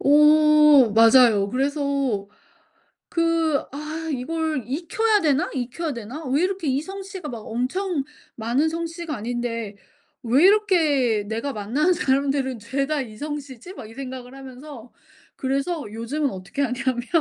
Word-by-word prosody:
어 300 -3 +6
맞아요. 225 -3 +6
그래서 275 -5 -1 0.8
그 330 -3 +1
'아 310 +3 -5
이걸 310 +1 -2
익혀야 410 - +1
되나? 310 +3 +1
익혀야 270 +5 -3
되나? 240 +8 -7
왜 280 +6 +1
이렇게 375 -4 -2
이 270 +2 +1
성씨가 385 -3 -7
막 235 - -6
엄청 270 - -2 0.3
많은 245 +8 0
성씨가 335 -1 -4
아닌데 230 -2 -4 0.5
왜 255 +7 +3
이렇게 315 - +3
내가 230 +6 -3
만나는 265 - +1
사람들은 270 -5 0
죄다 275 +5 -1
이 220 -4 -8
성씨지?' 290 +1 -7
막 215 - -10
이 225 - -12
생각을 255 -1 -8
하면서 265 -2 -11 0.4
그래서 275 +5 -2
요즘은 265 +6 -2
어떻게 190 +8 -5
하냐면 250 -1 -1
275 Hz, 275 characters per minute, -23 LUFS, 245-315 Hz, 0.8 s, 어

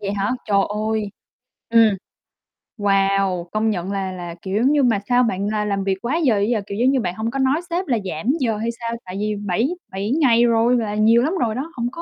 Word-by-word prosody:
Vậy 200 0 -3
hả? 200 +3 -1 0.2
Trời 200 -1 +3 0.3
ơi. 210 -2 -2 0.6
Ừm. 225 -3 +5 0.8
Wow. 195 -3 +1
Công 220 +1 +1
nhận 190 -1 -2
là 195 -1 -2
là, 175 -2 -7
kiểu, 190 +1 -4
giống 265 +4 +3
như 290 -2 +3
mà 225 -5 +3
sao 245 0 +4
bạn 200 -3 -1
là 210 0 -1
làm 200 -1 -1
việc 190 -1 0
quá 245 +6 -1
giờ 255 -11 +2
dữ 200 - +1
vậy? 215 - 0
Kiểu 200 - -5
giống 255 +3 +3
như, 270 - +2
bạn 180 -2 -3
hông 225 +2 -3
có 275 - -3
nói 270 +4 +2
sếp 355 +1 -2
là 240 - +1
giảm 160 -1 -5
giờ 225 -6 0
hay 225 +2 -2
sao? 230 0 -3
Tại 185 +1 -7
vì 210 0 -1
bảy 205 - -1 0.2
bảy 195 +3 -3
ngày 255 -6 +4
rồi 235 +1 +3
là 210 -2 -2
nhiều 225 +2 +4
lắm 315 +6 0
rồi 225 -2 0
đó, 295 +6 -4
hổng 235 -2 -2
có 335 - -8
215 Hz, 245 wpm, -21 LUFS, 195-245 Hz, 0.8 s, Ừm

